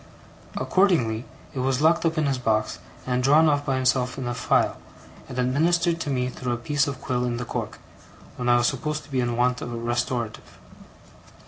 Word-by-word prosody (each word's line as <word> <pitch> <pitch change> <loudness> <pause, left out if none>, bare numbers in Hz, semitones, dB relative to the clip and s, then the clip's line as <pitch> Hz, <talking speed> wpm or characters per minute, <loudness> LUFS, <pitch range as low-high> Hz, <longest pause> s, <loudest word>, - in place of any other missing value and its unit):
Accordingly, 140 - +2 0.3
it 135 - -4
was 130 0 +1
locked 165 +2 +3
up 160 0 -2
in 155 - +2
his 135 -2 0
box, 110 -3 0 0.3
and 125 0 0
drawn 150 +5 +5
off 145 -1 +2
by 135 - +1
himself 130 -1 +1
in 130 -2 -4
a 120 - -1
phial, - - +1 0.5
and 125 - -7
administered 165 +7 +2
to 150 - -3
me 125 -2 0
through 125 -1 -3
a - - -2
piece 145 +5 0
of 140 -2 -4
quill 125 -3 -1
in 120 -1 -1
the 125 - -4
cork, - - -4 0.6
when 125 -1 -2
I 120 - +6
was 120 - +2
supposed 150 +4 -1
to 145 - -17
be 130 -2 +1
in 120 -1 -1
want 125 0 +1
of 120 - -5
a 120 - -4
restorative. 120 0 -3
130 Hz, 205 wpm, -25 LUFS, 120-145 Hz, 0.6 s, I